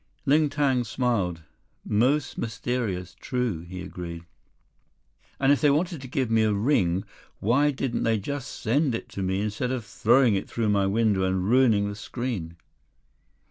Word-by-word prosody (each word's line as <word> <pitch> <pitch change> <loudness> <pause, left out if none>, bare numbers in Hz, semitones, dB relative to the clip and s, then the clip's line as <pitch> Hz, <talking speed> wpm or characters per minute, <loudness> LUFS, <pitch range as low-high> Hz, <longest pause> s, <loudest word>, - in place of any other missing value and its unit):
Ling 150 +2 +4
Tang 140 -4 +1
smiled. 110 -9 -1 0.4
"Most 130 +7 +1
mysterious, 110 -6 -3
true," 125 -9 -2
he 90 +2 -8
agreed. 85 -2 -7 1.1
"And 135 0 +4
if 145 - +3
they 150 - +5
wanted 160 +1 0
to 130 - -8
give 130 -2 -1
me 110 0 +4
a 110 -1 +3
ring, 100 -5 +1 0.3
why 135 +8 +3
didn't 135 -3 -2
they 115 -1 +2
just 140 +6 -4
send 130 +2 0
it - - -6
to 100 - -6
me, 95 +1 0
instead 110 +4 -2
of 125 -4 -3
throwing 120 +1 +3
it 95 - -2
through 115 -2 -1
my 100 -1 +2
window 105 -1 +2
and 95 0 0
ruining 115 -4 +4
the 100 - -4
screen?" 105 -7 -5
115 Hz, 160 wpm, -26 LUFS, 95-130 Hz, 1.1 s, they